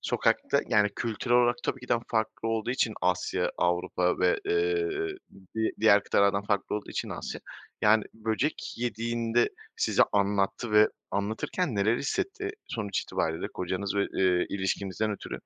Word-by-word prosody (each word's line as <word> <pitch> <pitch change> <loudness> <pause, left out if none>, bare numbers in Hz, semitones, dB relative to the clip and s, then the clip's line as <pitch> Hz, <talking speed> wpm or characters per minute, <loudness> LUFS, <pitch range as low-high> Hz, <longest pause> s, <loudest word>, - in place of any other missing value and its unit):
sokakta, - - +1
yani, 105 -1 +4
kültürel 120 +2 0
olarak 120 0 +4
tabii 130 - -2
ki 125 - -11
daha 115 - +2
farklı 110 0 -1
olduğu 115 +1 -1
için 120 -4 0
Asya, 90 0 0
Avrupa 90 +1 +1
ve, - - +3
eee, 425 0 +1 0.7
di 110 0 +1
diğer 105 -2 +6
kıtalardan 100 0 +3
farklı 100 0 -1
olduğu 105 - -7
için - - -3
Asya. - - -5 0.4
Yani, 110 0 +5
böcek 110 +7 -2
yediğinde 115 0 0 0.3
size - - +3
anlattı 100 +2 +1
ve 105 0 +7 0.2
anlatırken 110 - -1
neler 105 +4 +2
hissetti? 400 - -2 0.2
Sonuç 100 -4 -2
itibariyle 80 0 -2
kocanız 95 +2 -3
ve, 100 - +2
eee, 90 -2 +2
ilişkinizden 100 +2 -1
ötürü 105 - -5
110 Hz, 145 wpm, -28 LUFS, 100-120 Hz, 0.7 s, ve